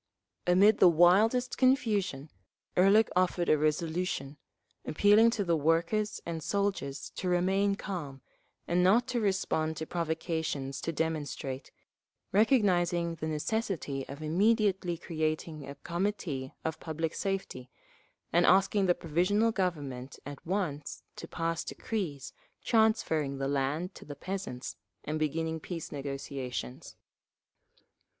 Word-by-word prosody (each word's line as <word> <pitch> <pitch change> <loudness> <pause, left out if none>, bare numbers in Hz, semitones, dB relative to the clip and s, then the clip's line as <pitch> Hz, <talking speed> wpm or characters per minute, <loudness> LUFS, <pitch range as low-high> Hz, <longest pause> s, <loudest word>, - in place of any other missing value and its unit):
Amid 200 +4 +5
the 180 - +8
wildest 200 +9 +4
confusion 210 - +1 0.4
Ehrlich 200 +4 +5
offered 180 -1 +1
a 155 - +5
resolution, 155 -1 -1 0.5
appealing 205 +7 +5
to 225 -3 -1
the 170 -3 +2
workers 165 +7 +1
and 165 -1 -4
soldiers 195 -8 -2
to 180 - -3
remain 190 +3 +2
calm 150 -10 -6 0.5
and 175 +1 +2
not 215 +7 +5
to 250 -1 0
respond 175 -6 0
to 160 - -4
provocations 160 -5 -2
to 165 - -2
demonstrate, 145 -4 -3 0.6
recognising 180 -7 +3
the 160 -1 -5
necessity 155 -3 -2
of 140 +3 -7
immediately 190 +1 +2
creating 155 -2 -3
a 140 - -7
Committee 170 -5 -3
of 160 -1 -2
Public 160 0 -3
Safety, 190 -10 -3 0.6
and 175 +1 +5
asking 195 +1 +4
the 175 - +4
Provisional 185 +8 +1
Government 145 - -3
at 145 0 -8
once 170 -7 -3
to - - -8
pass 165 -1 -2
decrees 165 - -4 0.3
transferring 165 - +2
the 135 0 -2
land 145 +6 -1
to - - -12
the 145 - -8
peasants 170 -7 -5 0.3
and 155 +1 -3
beginning 160 +1 -1
peace 165 0 -6
negotiations…. 135 - -5
170 Hz, 120 wpm, -30 LUFS, 150-195 Hz, 0.6 s, the